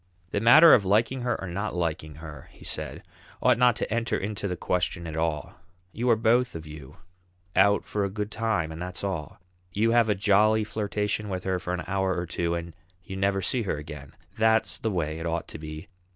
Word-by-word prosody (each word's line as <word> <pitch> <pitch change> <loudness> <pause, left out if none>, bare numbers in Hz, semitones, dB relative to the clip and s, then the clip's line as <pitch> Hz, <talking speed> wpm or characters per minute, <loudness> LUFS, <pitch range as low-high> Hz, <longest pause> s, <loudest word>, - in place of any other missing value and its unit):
"The 100 - 0
matter 155 +9 +9
of 105 - +5
liking 110 +7 +2
her 120 0 -1
or 95 - -5
not 100 +3 -3
liking 80 -3 -2
her," 75 -3 -10
he - - -16
said, - - -4 0.3
"ought - - +3
not 125 -2 +5
to - - -2
enter 115 0 0
into 100 0 -3
the 90 -2 -3
question 90 -1 -1
at 80 -2 -5
all. 80 -3 -2 0.4
You 120 +5 -1
are 115 - +6
both 115 +2 +2
of 80 -1 -6
you 75 -3 -11 0.6
out 100 +2 +4
for 105 - -2
a 100 - 0
good 105 +1 -4
time 110 -9 -1
and 80 +1 -7
that's 90 +1 -6
all; 90 -7 -4 0.3
you 110 +3 +2
have 115 -2 +4
a 105 - +3
jolly 105 +2 +3
flirtation 105 0 -2
with 90 -1 -3
her 95 -1 -1
for 90 - -5
an 90 - -5
hour 95 -1 0
or 85 - -2
two, 85 0 -1
and 85 -1 -5 0.3
you 95 -2 -7
never 95 0 0
see 125 +6 +1
her 100 -8 -2
again. 75 -2 -9 0.3
That's 110 0 +2
the 110 - -1
way 80 -5 -2
it 85 - -3
ought 85 0 -2
to - - -8
be! 75 +2 -8
95 Hz, 215 wpm, -26 LUFS, 85-110 Hz, 0.6 s, matter